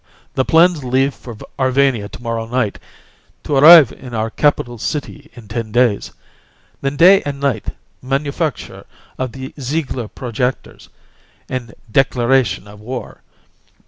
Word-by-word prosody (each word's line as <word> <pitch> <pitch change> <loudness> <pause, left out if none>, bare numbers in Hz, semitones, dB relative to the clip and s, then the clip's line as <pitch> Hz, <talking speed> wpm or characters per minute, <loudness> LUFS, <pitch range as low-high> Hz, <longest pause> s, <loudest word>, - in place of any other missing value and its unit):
"The 130 - +1
plans 165 0 +3
leave 130 +2 +1
for 120 -4 -11 0.2
Arvania 130 -5 +1
to - - -12
morrow 115 -1 -3
night, 120 -4 -1 0.6
to 145 - -2
arrive 155 -1 +9
in 125 -3 -10
our 110 0 -2
capital 120 -5 0
city 150 +3 -5
in 120 -4 -13
ten 110 +1 -5
days. 120 -3 +1 0.7
Then 135 +1 -2
day 190 +5 +7
and 140 -1 -5
night 135 -7 -2 0.3
manufacture 140 +3 -3 0.3
of 130 -2 -2
the 130 0 -8
Ziegler 130 -3 -3
projectors 125 +2 -4 0.6
and 120 -4 -6 0.2
declaration 130 -3 +1
of 105 0 -13
war. 125 +4 -7
130 Hz, 130 wpm, -18 LUFS, 115-140 Hz, 0.7 s, arrive